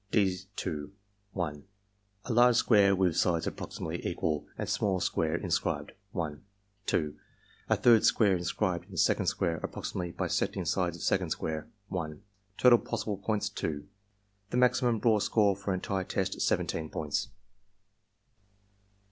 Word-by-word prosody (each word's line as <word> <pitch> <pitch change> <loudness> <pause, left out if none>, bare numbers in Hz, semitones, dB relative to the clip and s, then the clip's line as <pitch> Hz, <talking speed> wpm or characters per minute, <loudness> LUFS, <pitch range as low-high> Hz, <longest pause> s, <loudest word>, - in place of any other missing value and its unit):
(d^) 95 -3 +1 0.9
L 90 - 0 0.8
A 125 - -2
large 120 +1 +6
square 100 -4 +5
with 90 -3 +2
sides 85 -2 +2
approximately - - -5
equal, 75 -2 -1
and - - -3
small 95 -3 +1
square 80 -1 0
inscribed 85 -5 -1 0.2
1 80 -6 -4 0.4
2. 75 -3 0 0.5
A - - +5
third 115 -3 +5
square 100 -4 +4
inscribed 90 +1 -1
in - - -9
second - - +2
square 85 -1 0
approximately 85 +2 -4
bisecting 90 +1 -1
sides 90 0 0
of - - -8
second - - +1
square 80 +5 -3 0.2
1 80 -5 -4 0.4
Total 125 -2 +7
possible 105 -2 -3
points, 105 0 -1
2. 75 0 -4 0.6
The 120 - -1
maximum 125 -1 +3
raw 110 -3 +4
score 100 -1 +3
for 100 0 -4
entire 95 +1 -1
test, - - -2
17 80 -1 0
points. 75 +6 -2
95 Hz, 130 wpm, -30 LUFS, 85-105 Hz, 0.9 s, Total